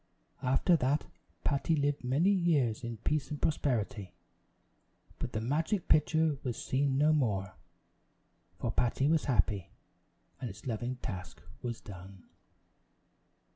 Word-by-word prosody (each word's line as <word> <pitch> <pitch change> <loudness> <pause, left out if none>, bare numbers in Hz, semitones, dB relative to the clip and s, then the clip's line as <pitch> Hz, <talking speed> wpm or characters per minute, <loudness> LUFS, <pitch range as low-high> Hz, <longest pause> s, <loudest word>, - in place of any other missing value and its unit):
After 135 +8 +3
that 140 +2 +1 0.4
Patty 145 +3 +1
lived 145 -1 0
many 145 +10 +3
years 150 - +2
in 120 -1 -4
peace 145 +5 -1
and 150 - -4
prosperity; 120 - -1 1.0
but - - -3
the 110 - 0
magic 160 - 0
pitcher 155 -1 +3
was 120 -3 -3
seen 135 0 +1
no 150 +2 +5
more, 105 -10 0 1.0
for 115 - -1
Patty 125 +4 +1
was 160 0 +2
happy, 105 - +1 0.7
and 125 -2 -4
its 100 +1 -11
loving 120 +1 -2
task 95 -5 -6 0.2
was 120 -1 -4
done. 95 -2 -11
130 Hz, 125 wpm, -32 LUFS, 110-150 Hz, 1.0 s, no